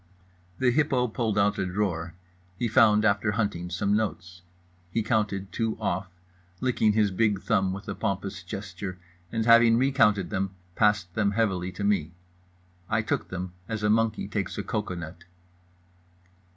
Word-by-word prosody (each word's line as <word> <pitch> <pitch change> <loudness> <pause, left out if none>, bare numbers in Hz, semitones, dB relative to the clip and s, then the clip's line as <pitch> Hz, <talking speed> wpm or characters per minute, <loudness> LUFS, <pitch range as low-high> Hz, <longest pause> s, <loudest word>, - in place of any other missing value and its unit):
The 125 -1 +3
hippo 135 -3 +2
pulled 110 -2 -1
out 100 0 +2
a 95 - 0
drawer. 90 -3 -2 0.4
He 120 - 0
found, 105 -1 +5
after 105 0 +2
hunting, 100 -5 -2
some 100 +3 0
notes. 90 -5 -3 0.5
He 115 - 0
counted 105 -4 -1
two 110 +4 -1
off, 95 -3 -1 0.5
licking 110 -3 +2
his 105 -2 +2
big 105 0 +1
thumb 95 -1 +1
with 100 +3 -7
a 100 - -2
pompous 100 -2 -3
gesture, 95 -1 -6 0.3
and 115 -1 -1
having 115 0 +6
recounted 115 - +3
them 95 0 -2 0.2
passed 105 -5 +2
them 100 -1 +1
heavily 95 -5 0
to 100 - -5
me. 95 -6 +1 0.8
I 110 0 +1
took - - -1
them 90 0 -5 0.2
as 110 -1 -3
a 105 - +3
monkey 110 -2 +1
takes 100 -1 -3
a 105 - -2
cocoanut. 90 -6 -5
105 Hz, 150 wpm, -27 LUFS, 95-110 Hz, 0.8 s, having